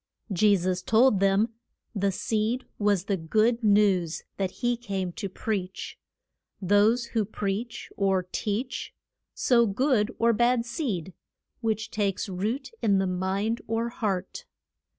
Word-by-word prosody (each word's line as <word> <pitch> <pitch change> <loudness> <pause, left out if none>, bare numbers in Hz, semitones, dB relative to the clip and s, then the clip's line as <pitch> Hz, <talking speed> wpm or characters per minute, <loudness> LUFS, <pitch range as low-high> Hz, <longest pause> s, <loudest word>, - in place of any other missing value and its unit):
Je 200 +2 +4
sus 180 0 -1
told 220 +2 +4
them 195 +3 +3 0.4
the 200 -2 +1
seed 220 +6 -1
was 205 -3 +2
the 200 0 0
good 220 +8 +1
news 200 -6 +3
that 195 -2 0
he 240 +5 -1
came 195 -6 -3
to 200 +1 -5
preach. 190 -1 -4 0.6
Those 205 +5 +3
who 225 -2 +2
preach, 210 +3 -4
or 195 -2 +2
teach, 230 +5 -3 0.4
sow 235 -2 +4
good 220 +1 +2
or 230 0 +3
bad 240 +1 +2
seed, 215 - -3 0.5
which 220 -1 -2
takes 200 -1 -1
root 210 - -3
in 200 -3 +3
the 190 - +1
mind 190 +5 -1
or 225 +1 -1
heart. 200 -5 -3
210 Hz, 130 wpm, -27 LUFS, 195-230 Hz, 0.6 s, Je